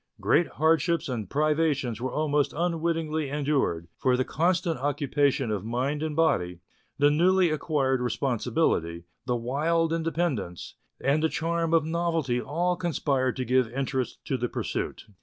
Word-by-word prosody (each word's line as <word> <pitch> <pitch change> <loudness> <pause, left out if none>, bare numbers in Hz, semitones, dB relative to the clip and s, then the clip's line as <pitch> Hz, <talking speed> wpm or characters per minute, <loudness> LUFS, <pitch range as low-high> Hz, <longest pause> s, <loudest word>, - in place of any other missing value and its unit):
Great 175 - +3
hardships 165 +1 +2
and 120 -6 -4
privations 150 -5 0
were 130 0 -2
almost 150 -2 0
unwittingly 165 -3 -1
endured, 135 - 0
for 130 -1 +2
the 130 - 0
constant 170 -1 0
occupation 140 -3 0
of 100 -3 -2
mind 130 +6 -1
and 155 -1 -2
body, 90 - +1 0.4
the 145 0 +4
newly 180 +2 +3
acquired 140 -4 0
responsibility, 120 - 0 0.2
the 125 - +1
wild 160 +7 0
inde 165 -1 -1
pendence, 140 - -2 0.3
and 140 +3 +1
the 160 - +2
charm 165 +1 -1
of 165 -2 +3
novelty 165 -6 0
all 175 +7 0
conspired 145 -7 0
to 130 - -3
give 125 -1 +2
interest 130 0 -3
to 135 - -1
the 120 0 -2
pursuit. - - -4
145 Hz, 145 wpm, -27 LUFS, 130-165 Hz, 0.4 s, the